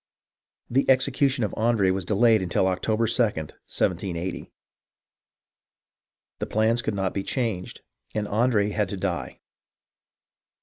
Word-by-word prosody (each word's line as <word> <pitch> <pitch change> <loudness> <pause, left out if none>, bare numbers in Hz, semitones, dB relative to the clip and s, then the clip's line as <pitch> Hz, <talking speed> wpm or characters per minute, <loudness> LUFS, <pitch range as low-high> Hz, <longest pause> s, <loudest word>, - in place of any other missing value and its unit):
The 135 +3 +1
execution 135 0 +3
of 105 - -2
Andre 110 -4 +2
was 95 -1 -2
delayed 110 0 +4
until 95 +1 +1
October 110 +5 +1
2d, 115 - -1 0.5
1780. 90 0 -2 1.9
The - - -2
plans 110 +2 +2
could 110 - -2
not 95 -1 -1
be 100 - -1
changed, 110 -5 -3 0.3
and 105 -1 -1
Andre 105 -1 +2
had 105 0 -1
to 100 - -4
die. 95 -2 -4
105 Hz, 120 wpm, -25 LUFS, 95-115 Hz, 1.9 s, delayed